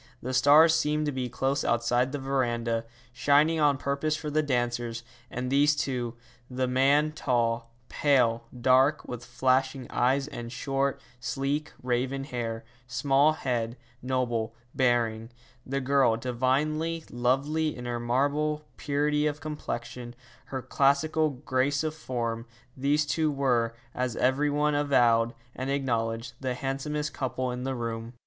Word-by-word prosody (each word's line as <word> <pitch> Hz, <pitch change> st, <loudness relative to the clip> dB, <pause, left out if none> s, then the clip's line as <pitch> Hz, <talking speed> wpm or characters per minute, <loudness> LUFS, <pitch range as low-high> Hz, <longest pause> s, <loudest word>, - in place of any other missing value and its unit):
The 130 Hz, +1 st, -4 dB
stars 145 Hz, +5 st, +6 dB
seemed 150 Hz, -1 st, +1 dB
to 145 Hz, -, 0 dB
be 130 Hz, -2 st, -3 dB
close 135 Hz, +3 st, -1 dB
outside 120 Hz, +2 st, +1 dB
the 145 Hz, -, -2 dB
verandah, 120 Hz, -4 st, -1 dB, 0.3 s
shining 145 Hz, +5 st, +3 dB
on 145 Hz, -2 st, +4 dB
purpose 140 Hz, +3 st, -1 dB
for 150 Hz, -1 st, -5 dB
the 155 Hz, +1 st, +2 dB
dancers; 120 Hz, -4 st, -1 dB, 0.3 s
and 125 Hz, +1 st, -4 dB
these 145 Hz, +2 st, +4 dB
two 125 Hz, -4 st, -2 dB, 0.3 s
the 130 Hz, 0 st, -1 dB
man 140 Hz, +4 st, +3 dB
tall, 120 Hz, -5 st, 0 dB, 0.2 s
pale, 120 Hz, -5 st, +2 dB
dark, 130 Hz, +4 st, +3 dB
with 120 Hz, -1 st, -6 dB
flashing 130 Hz, +2 st, +1 dB
eyes 135 Hz, +3 st, +2 dB
and 120 Hz, -5 st, -7 dB
short, 135 Hz, +2 st, -1 dB, 0.2 s
sleek 135 Hz, +4 st, -2 dB
raven 130 Hz, +2 st, -1 dB
hair, 115 Hz, -4 st, -4 dB, 0.2 s
small 135 Hz, +4 st, +3 dB
head, 120 Hz, -4 st, -2 dB, 0.2 s
noble 120 Hz, -3 st, -1 dB, 0.2 s
bearing; 115 Hz, -3 st, +1 dB, 0.4 s
the 135 Hz, +1 st, -1 dB
girl 135 Hz, -4 st, +3 dB
divinely 145 Hz, +7 st, 0 dB
lovely 140 Hz, +6 st, 0 dB
in 125 Hz, -, -7 dB
her 120 Hz, 0 st, -2 dB
marble 145 Hz, +5 st, 0 dB
purity 150 Hz, +1 st, +1 dB
of 150 Hz, 0 st, -3 dB
complexion, 125 Hz, -5 st, -6 dB, 0.3 s
her 130 Hz, -2 st, -5 dB
classical 155 Hz, +3 st, +2 dB
grace 140 Hz, +1 st, 0 dB
of 155 Hz, -1 st, -1 dB
form 120 Hz, -6 st, -3 dB, 0.3 s
these 145 Hz, +3 st, +1 dB
two 155 Hz, 0 st, +1 dB
were, 125 Hz, -5 st, +1 dB, 0.2 s
as 125 Hz, -2 st, -2 dB
every 135 Hz, +4 st, +2 dB
one 150 Hz, +1 st, +1 dB
avowed 120 Hz, -5 st, +3 dB, 0.2 s
and 130 Hz, +1 st, -4 dB
acknowledged, 115 Hz, -4 st, -1 dB
the 130 Hz, -2 st, -2 dB
handsomest 145 Hz, +3 st, -3 dB
couple 130 Hz, -1 st, -2 dB
in 125 Hz, +1 st, -4 dB
the 135 Hz, 0 st, -2 dB
room. 115 Hz, 0 st, -4 dB
130 Hz, 140 wpm, -28 LUFS, 120-145 Hz, 0.4 s, stars